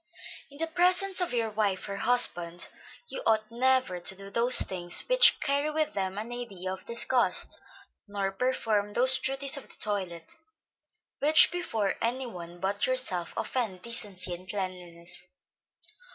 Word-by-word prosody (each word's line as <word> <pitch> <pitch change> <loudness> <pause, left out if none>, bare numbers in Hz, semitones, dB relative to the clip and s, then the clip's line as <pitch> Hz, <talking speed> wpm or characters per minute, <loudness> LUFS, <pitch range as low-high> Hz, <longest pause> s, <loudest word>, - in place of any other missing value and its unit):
In 285 - -14
the 325 - +1
presence 360 +3 +2
of 360 - 0
your 230 -2 -1
wife 205 -3 -1
or 200 -1 -5
husband, 175 -8 +1 0.4
you - - -5
ought 215 0 +1
never 255 -5 +1
to 175 +2 -2
do 195 +1 -10
those 240 +3 +6
things 175 -2 +1
which - - +6
carry 285 0 +1
with 310 0 -1
them 190 0 -3
an 220 +3 -5
idea 195 -7 -5
of 190 - -11
disgust, 235 +2 +1 0.5
nor 200 -1 -2
perform 210 -2 -1
those 260 +3 +4
duties 270 +1 0
of 275 - -8
the - - -12
toilet, 185 -5 -2 0.9
which 305 +2 +7
before 230 - -2
any 250 +3 -1
one 175 -6 -9
but 195 +2 -1
yourself 255 -10 -1
offend 215 -8 -3
decency 205 -6 -4
and 180 +1 -9
cleanliness. 180 -2 -5
215 Hz, 150 wpm, -28 LUFS, 185-260 Hz, 0.9 s, which